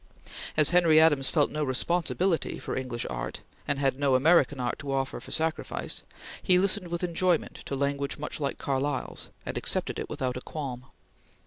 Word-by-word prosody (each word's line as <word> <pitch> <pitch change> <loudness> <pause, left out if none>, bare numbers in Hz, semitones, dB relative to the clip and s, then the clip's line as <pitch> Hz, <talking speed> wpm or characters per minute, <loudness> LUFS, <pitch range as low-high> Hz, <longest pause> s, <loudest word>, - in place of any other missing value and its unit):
As 155 0 +9
Henry 170 -3 +5
Adams 145 -4 +5
felt 150 -3 +2
no 150 0 -2
responsibility 170 +5 0
for - - -5
English 125 -3 -4
art, - - -5 0.3
and 145 - +1
had 135 -1 0
no 140 -2 +3
American 145 0 +3
art 120 -1 -2
to 145 -2 -5
offer 135 -1 -2
for - - -13
sacrifice, 160 0 -1 0.4
he 180 -2 +5
listened 195 0 +1
with 170 +1 -4
enjoyment 175 -1 0
to 140 - -3
language 140 0 -2
much 150 +1 -5
like 140 -2 -2
Carlyle's, 135 0 -3 0.2
and - - -3
accepted - - 0
it - - -5
without 125 -1 -3
a - - -6
qualm. 130 -5 -6
145 Hz, 175 wpm, -27 LUFS, 135-165 Hz, 0.4 s, As